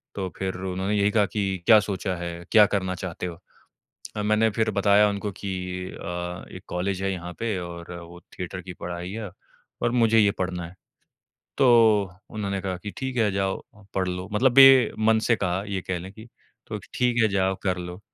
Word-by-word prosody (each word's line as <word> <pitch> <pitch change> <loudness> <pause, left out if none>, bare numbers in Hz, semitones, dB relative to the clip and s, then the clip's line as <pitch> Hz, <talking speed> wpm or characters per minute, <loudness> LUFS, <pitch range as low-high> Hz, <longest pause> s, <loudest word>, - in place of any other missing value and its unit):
तो 95 -2 -2
फिर 95 -1 -3
उन्होंने 95 +2 -2
यही 100 0 +3
कहा 105 -1 +3
कि, 95 -4 -2
"क्या 110 -2 +8
सोचा 95 -1 -3
है, 85 0 -6
क्या 105 -2 +8
करना 95 -2 -1
चाहते 90 -1 -5
हो? 85 -2 -5 0.8
अ, - - -1
मैंने 110 +1 +3
फिर 110 +1 0
बताया 100 +1 +4
उनको 100 0 -3
कि 100 +1 -6 0.4
अ, 90 +1 -5
"एक 90 - -10
कॉलेज 95 +2 -2
है 95 - 0
यहाँ 90 -1 -6
पे, 115 -4 -1
और 85 -1 -8
वो 85 +1 -12 0.2
थिएटर 90 0 -5
की 90 +1 -8
पढ़ाई 90 +1 -6
है, 110 -1 -5 0.5
और 120 - +1
मुझे 115 -2 +4
ये 100 -2 +5
पढ़ना 90 -1 -2
है।" 85 - -15 0.8
तो 135 - +5 0.6
उन्होंने 100 -2 -3
कहा 95 -1 -2
कि, 105 +3 -7
"ठीक 130 -1 -4
है, 110 -2 +3
जाओ, 95 0 -1 0.3
पढ़ 95 -1 0
लो।" 90 +1 -4
मतलब 120 +5 +3
बेमन 120 -5 +7
से 115 - +5
कहा, 95 -1 -1
ये 95 -1 -2
कह 95 -1 -1
लें 95 +3 -9
कि, 110 +2 -12 0.4
"तो - - -5 0.2
ठीक 120 -1 +2
है, 110 - +4
जाओ, 95 -1 +1
कर 90 -2 0
लो।" 90 +1 -7
95 Hz, 195 wpm, -25 LUFS, 90-105 Hz, 0.8 s, क्या